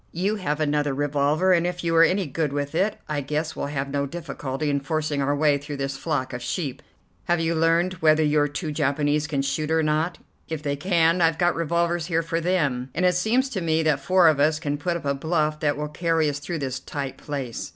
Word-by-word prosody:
You 195 Hz, +6 st, -1 dB
have 150 Hz, -6 st, -2 dB
another 145 Hz, -2 st, 0 dB
revolver, 145 Hz, +5 st, +2 dB
and 175 Hz, 0 st, +2 dB
if 180 Hz, 0 st, -4 dB
you 165 Hz, -1 st, 0 dB
are 165 Hz, -, +7 dB
any 185 Hz, +3 st, +2 dB
good 150 Hz, 0 st, -2 dB
with 145 Hz, +1 st, -3 dB
it 195 Hz, +6 st, +1 dB
I 150 Hz, -1 st, -2 dB
guess 150 Hz, +3 st, -3 dB
we'll -, -, -3 dB
have 140 Hz, -1 st, -3 dB
no 140 Hz, 0 st, -1 dB
difficulty 145 Hz, -2 st, -4 dB
in 140 Hz, -1 st, +1 dB
forcing 150 Hz, 0 st, -2 dB
our 140 Hz, +1 st, +1 dB
way 145 Hz, -1 st, +3 dB
through 145 Hz, 0 st, -7 dB
this 135 Hz, 0 st, -3 dB
flock 140 Hz, -4 st, -2 dB
of 125 Hz, -, -5 dB
sheep. 140 Hz, 0 st, -3 dB, 0.4 s
Have 175 Hz, -1 st, +1 dB
you 165 Hz, 0 st, 0 dB
learned 165 Hz, +3 st, +2 dB
whether 155 Hz, 0 st, +4 dB
your 150 Hz, -1 st, +3 dB
two 150 Hz, +2 st, -4 dB
Japanese 145 Hz, 0 st, 0 dB
can 140 Hz, -3 st, -1 dB
shoot 150 Hz, +3 st, -2 dB
or 160 Hz, 0 st, +2 dB
not? 155 Hz, +3 st, 0 dB, 0.3 s
If 160 Hz, -2 st, -4 dB
they 145 Hz, -2 st, -1 dB
can, 170 Hz, +2 st, +2 dB
I've 165 Hz, -1 st, +3 dB
got 175 Hz, 0 st, +2 dB
revolvers 170 Hz, +1 st, 0 dB
here 165 Hz, -1 st, +1 dB
for 165 Hz, 0 st, -2 dB
them, 145 Hz, -8 st, 0 dB
and 185 Hz, -, +1 dB
it 180 Hz, -, +4 dB
seems 220 Hz, +9 st, +1 dB
to 200 Hz, -8 st, -3 dB
me 160 Hz, -1 st, +1 dB
that 155 Hz, -3 st, +2 dB
four 180 Hz, +5 st, +4 dB
of 155 Hz, -3 st, +4 dB
us 155 Hz, +2 st, +3 dB
can 145 Hz, -3 st, -2 dB
put 170 Hz, +3 st, -1 dB
up 165 Hz, -, -10 dB
a 140 Hz, -, +1 dB
bluff 155 Hz, +1 st, 0 dB
that 145 Hz, -2 st, 0 dB
will 150 Hz, 0 st, -3 dB
carry 165 Hz, 0 st, +1 dB
us 145 Hz, 0 st, -3 dB
through 165 Hz, +4 st, -4 dB
this 130 Hz, -3 st, -3 dB
tight 140 Hz, -1 st, -5 dB
place. 135 Hz, -6 st, -5 dB
155 Hz, 235 wpm, -24 LUFS, 145-170 Hz, 0.4 s, are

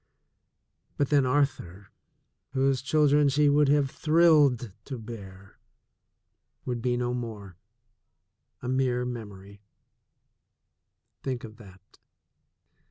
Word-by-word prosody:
But 140 Hz, -, 0 dB
then 140 Hz, -3 st, +3 dB
Arthur, 125 Hz, -9 st, -1 dB, 0.6 s
whose 135 Hz, -1 st, +1 dB
children 145 Hz, +1 st, +3 dB
she 145 Hz, +2 st, +3 dB
would 145 Hz, 0 st, +3 dB
have 140 Hz, -1 st, +2 dB
thrilled 150 Hz, -, +3 dB
to 135 Hz, -, -6 dB
bear, 100 Hz, -4 st, -11 dB, 1.1 s
would 120 Hz, -2 st, -3 dB
be 120 Hz, 0 st, 0 dB
no 125 Hz, 0 st, -1 dB
more, 110 Hz, -6 st, -6 dB, 1.1 s
a -, -, -4 dB
mere 125 Hz, -1 st, 0 dB
memory 100 Hz, -4 st, -8 dB, 0.8 s
— -, -, -55 dB
think 130 Hz, -3 st, -3 dB
of 110 Hz, -1 st, -10 dB
that! 95 Hz, -4 st, -18 dB
125 Hz, 100 wpm, -27 LUFS, 110-140 Hz, 1.1 s, then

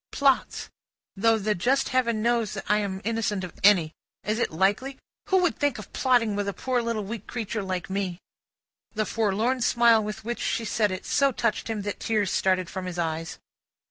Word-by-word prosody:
"Plots. 275 Hz, -2 st, +1 dB, 0.4 s
Though 225 Hz, +3 st, +3 dB
the 210 Hz, 0 st, 0 dB
just 250 Hz, +9 st, +1 dB
Heaven 235 Hz, -4 st, +1 dB
knows 235 Hz, -3 st, +1 dB
that -, -, -6 dB
I 210 Hz, -, +3 dB
am 195 Hz, -2 st, -3 dB
innocent 215 Hz, -3 st, -1 dB
of 180 Hz, -, -6 dB
any. 185 Hz, -6 st, +5 dB, 0.3 s
Is 215 Hz, +2 st, -1 dB
it -, -, +1 dB
likely? 200 Hz, +11 st, 0 dB, 0.3 s
Who 380 Hz, -, +4 dB
would 350 Hz, -, 0 dB
think 290 Hz, -4 st, +1 dB
of 215 Hz, -, -10 dB
plotting 240 Hz, -5 st, +2 dB
with 205 Hz, 0 st, -2 dB
a 200 Hz, -, -1 dB
poor 255 Hz, -2 st, 0 dB
little 230 Hz, -2 st, -2 dB
weak 215 Hz, +1 st, -7 dB
creature 225 Hz, -2 st, -3 dB
like 185 Hz, -2 st, -3 dB
me?" 190 Hz, -2 st, -2 dB, 0.8 s
The 215 Hz, 0 st, 0 dB
forlorn 225 Hz, +4 st, 0 dB
smile 235 Hz, -1 st, +4 dB
with 210 Hz, +1 st, -6 dB
which 240 Hz, +1 st, -3 dB
she 230 Hz, -, -1 dB
said 210 Hz, 0 st, +1 dB
it, 185 Hz, 0 st, -5 dB
so 275 Hz, -1 st, +2 dB
touched 230 Hz, -3 st, -1 dB
him, 220 Hz, -3 st, -3 dB
that 205 Hz, 0 st, -4 dB
tears 210 Hz, -4 st, 0 dB
started 185 Hz, -1 st, +1 dB
from 185 Hz, +1 st, -5 dB
his 180 Hz, -1 st, -5 dB
eyes. 165 Hz, -1 st, -3 dB
215 Hz, 195 wpm, -26 LUFS, 195-235 Hz, 0.8 s, any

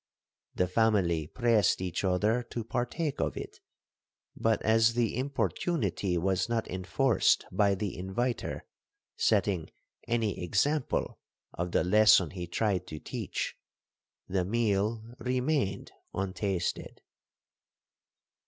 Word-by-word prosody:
The 90 Hz, -, +2 dB
family 90 Hz, -6 st, +2 dB
pressed 115 Hz, -2 st, +2 dB
each 90 Hz, 0 st, -3 dB
other 105 Hz, +6 st, +2 dB
to 120 Hz, -, -4 dB
partake 125 Hz, +7 st, -2 dB
of -, -, -1 dB
it; -, -, -7 dB, 0.8 s
but 115 Hz, 0 st, +1 dB
as 115 Hz, +1 st, +4 dB
the 120 Hz, -3 st, +1 dB
importunity 115 Hz, -, -1 dB
was 95 Hz, +4 st, 0 dB
not 115 Hz, -2 st, -1 dB
enforced 95 Hz, +6 st, +2 dB
by 100 Hz, +1 st, +3 dB
the 100 Hz, 0 st, -3 dB
inviter 105 Hz, +7 st, -3 dB, 0.5 s
setting -, -, +1 dB, 0.4 s
any 115 Hz, -6 st, 0 dB
example 140 Hz, -, 0 dB, 0.3 s
of 90 Hz, 0 st, -3 dB
the -, -, +2 dB
lesson 95 Hz, -3 st, +5 dB
he 90 Hz, -2 st, -6 dB
tried 90 Hz, 0 st, 0 dB
to 80 Hz, -, -6 dB
teach, -, -, -4 dB, 0.7 s
the 95 Hz, -1 st, 0 dB
meal 110 Hz, +1 st, 0 dB, 0.2 s
remained 125 Hz, -5 st, -1 dB, 0.2 s
untasted. 95 Hz, -1 st, -2 dB
105 Hz, 105 wpm, -30 LUFS, 90-115 Hz, 0.8 s, lesson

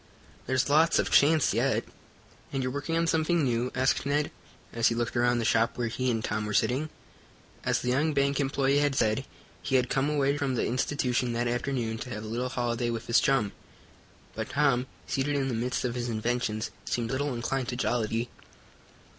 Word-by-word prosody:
There's 130 Hz, 0 st, +1 dB
lots 155 Hz, +3 st, +4 dB
of -, -, 0 dB
chance 155 Hz, 0 st, +5 dB
yet." -, -, +1 dB, 0.7 s
"And 135 Hz, -1 st, -1 dB
you're 130 Hz, -, -1 dB
working 145 Hz, +4 st, -2 dB
on 165 Hz, -, +2 dB
something 165 Hz, 0 st, +2 dB
new?" 125 Hz, -1 st, 0 dB
asked 130 Hz, 0 st, +2 dB
Ned, 145 Hz, +2 st, 0 dB, 0.4 s
as 115 Hz, -1 st, +3 dB
he 115 Hz, -, +1 dB
looked 120 Hz, +1 st, -2 dB
around 120 Hz, 0 st, +3 dB
the 115 Hz, -, -1 dB
shop 115 Hz, +1 st, +2 dB
where 120 Hz, -2 st, -1 dB
he 130 Hz, +2 st, -1 dB
and 115 Hz, -2 st, -1 dB
Tom 105 Hz, 0 st, -2 dB
were 105 Hz, -, -2 dB
sitting. 140 Hz, +5 st, +1 dB, 0.7 s
As -, -, +1 dB
the 125 Hz, -, -1 dB
young 145 Hz, +5 st, +2 dB
bank 140 Hz, -1 st, +1 dB
employee 140 Hz, 0 st, +2 dB
had 145 Hz, -2 st, +1 dB
said, 110 Hz, +2 st, +1 dB, 0.4 s
he 135 Hz, -, -1 dB
had 125 Hz, -2 st, +2 dB
come 135 Hz, +2 st, +1 dB
away 140 Hz, -1 st, +1 dB
from 135 Hz, -3 st, 0 dB
the -, -, 0 dB
institution 125 Hz, -1 st, 0 dB
that 120 Hz, +1 st, 0 dB
afternoon 120 Hz, -2 st, -2 dB
to 125 Hz, -, -6 dB
have 105 Hz, -2 st, -5 dB
a -, -, -7 dB
little 120 Hz, +3 st, -2 dB
holiday 120 Hz, -1 st, -1 dB
with 115 Hz, -1 st, -3 dB
his 115 Hz, -, +4 dB
chum, 135 Hz, -8 st, +2 dB, 0.8 s
but -, -, -4 dB
Tom, 125 Hz, +1 st, +2 dB, 0.2 s
seated 145 Hz, +2 st, -1 dB
in 135 Hz, -1 st, 0 dB
the -, -, -2 dB
midst 125 Hz, +3 st, -1 dB
of 120 Hz, -, -1 dB
his 120 Hz, 0 st, -3 dB
inventions, 110 Hz, -1 st, -1 dB
seemed 120 Hz, 0 st, -2 dB
little 140 Hz, 0 st, -1 dB
inclined 125 Hz, +2 st, -2 dB
to 125 Hz, -, -3 dB
jollity. 115 Hz, -2 st, 0 dB
125 Hz, 195 wpm, -28 LUFS, 120-140 Hz, 0.8 s, chance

